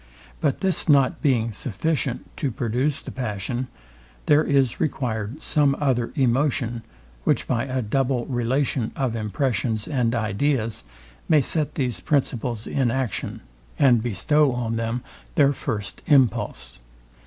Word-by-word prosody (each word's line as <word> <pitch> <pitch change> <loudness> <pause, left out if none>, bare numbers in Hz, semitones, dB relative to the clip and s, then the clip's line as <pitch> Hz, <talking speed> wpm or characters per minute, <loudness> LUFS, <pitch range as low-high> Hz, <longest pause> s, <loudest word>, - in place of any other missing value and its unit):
But 135 - 0
this 190 -3 0
not 140 -3 +4
being 115 -5 +2
sufficient 125 +4 -2
to 140 - 0
produce 125 +6 -1
the - - -8
passion, 120 +1 -3 0.6
there 150 +1 +5
is 135 -4 +2
required 125 -4 -2
some 145 -3 +3
other 125 -5 +1
emotion, 125 -2 +1 0.4
which - - +2
by 120 0 0
a 130 -1 -2
double 125 +2 0
relation 125 -1 0
of 130 -4 -1
impressions 110 -1 -1
and 125 -5 +1
ideas 115 +1 0 0.5
may 155 - +6
set 150 +2 -1
these 125 -5 -1
principles 125 -5 -1
in 130 -3 0
action, 120 -8 -2 0.4
and 125 -5 +5
bestow 135 - +2
on 115 -2 -2
them 115 +2 -2 0.3
their 140 -1 +5
first 105 -7 -4
impulse. 135 -6 +2
125 Hz, 130 wpm, -24 LUFS, 115-140 Hz, 0.6 s, may